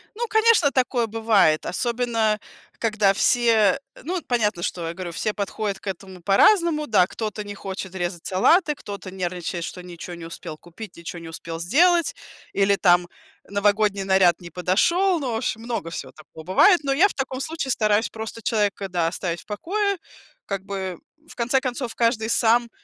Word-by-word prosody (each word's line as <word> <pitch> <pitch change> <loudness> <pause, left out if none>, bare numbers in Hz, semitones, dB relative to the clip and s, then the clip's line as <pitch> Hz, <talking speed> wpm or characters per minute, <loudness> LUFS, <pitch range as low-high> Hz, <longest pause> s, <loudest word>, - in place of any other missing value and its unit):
Ну, 475 +2 -2
конечно, 440 -9 +4
такое 250 -3 +1
бывает, 215 -8 +2
особенно 230 -1 0 0.4
когда 215 -3 +2
все, 230 +1 +3 0.3
ну, 355 +5 -2
понятно, 210 -7 0
что 170 -2 -3
я 165 - -4
говорю, 180 -1 -6
все 210 +6 -2
подходят 200 0 -3
к - - -14
этому 190 -1 -6
по-разному. 305 - +4
Да, 195 -5 +4
кто-то 215 0 -5
не 205 0 -7
хочет 190 -1 -6
резать 175 -2 -4
салаты, 300 - +3
кто-то 200 -6 -8
нервничает, 175 -2 -4
что 180 - -8
ничё 175 0 -9
не 170 -1 -8
успел 165 -1 -8
купить, 175 +5 -11
ничё 170 +1 -8
не 165 - -10
успел 165 0 -7
сделать, 335 - +3 0.4
или, 200 0 +3
там, 175 -2 +4 0.4
новогодний 200 0 +1
наряд 190 -3 +4
не 175 - -10
подошел. 340 - +2
Ну 265 -4 -3
в - - -1
общем, 225 -1 -2
много 230 -8 -3
всего 165 - -7
такого 155 +1 -13
бывает. 340 - +5
Но 275 -1 +1
я 355 +9 +5
в - - -7
таком 265 -1 -3
случае 310 -3 -3
стараюсь 215 -1 +2
просто 225 +1 -7
человека, 205 -3 0
да, 175 -3 0
оставить 170 0 -3
в - - -18
покое. 395 - -1 0.5
Как 195 -2 -4
бы, 190 -3 -4 0.3
в - - -12
конце 245 +3 +1
концов, 250 -2 -4
каждый 230 -2 +1
сам 235 +1 +3
210 Hz, 175 wpm, -23 LUFS, 180-245 Hz, 0.5 s, бывает